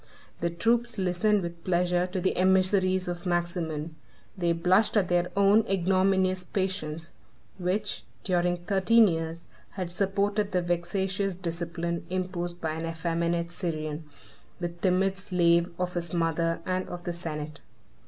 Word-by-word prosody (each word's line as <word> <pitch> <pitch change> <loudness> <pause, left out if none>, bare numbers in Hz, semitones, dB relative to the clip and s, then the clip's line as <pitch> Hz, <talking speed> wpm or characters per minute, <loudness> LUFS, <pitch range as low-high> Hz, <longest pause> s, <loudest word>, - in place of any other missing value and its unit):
The 170 - 0
troops 230 +6 +1
listened 190 +2 +2
with 170 -1 -6
pleasure 180 0 +1
to 185 +1 -3
the 185 +1 +1
emissaries 185 0 +3
of 175 +1 -4
Maximin. 170 -3 -2 0.4
They 175 -3 +1
blushed 185 +6 +3
at 190 -4 +2
their 175 0 +2
own 200 +2 +5
ignominious 190 0 +2
patience, 175 -5 -3 0.5
which, 195 +3 -1 0.2
during 175 -2 +1
thirteen 210 +4 +5
years, 165 -1 -2 0.3
had 185 -3 -4
supported 200 +2 0
the 180 - +3
vexatious 190 +2 -1
discipline 170 -1 -3
imposed 180 -1 -3
by 160 -2 -2
an 160 +1 -3
effeminate 170 +1 -1
Syrian, 155 -3 -3 0.5
the 175 -1 -1
timid 185 +2 +1
slave 170 -2 +3
of 180 0 -2
his 170 0 -3
mother 165 0 0
and 185 0 -1
of 175 0 -6
the 175 - -3
senate. 155 -3 -5
180 Hz, 135 wpm, -28 LUFS, 170-190 Hz, 0.5 s, own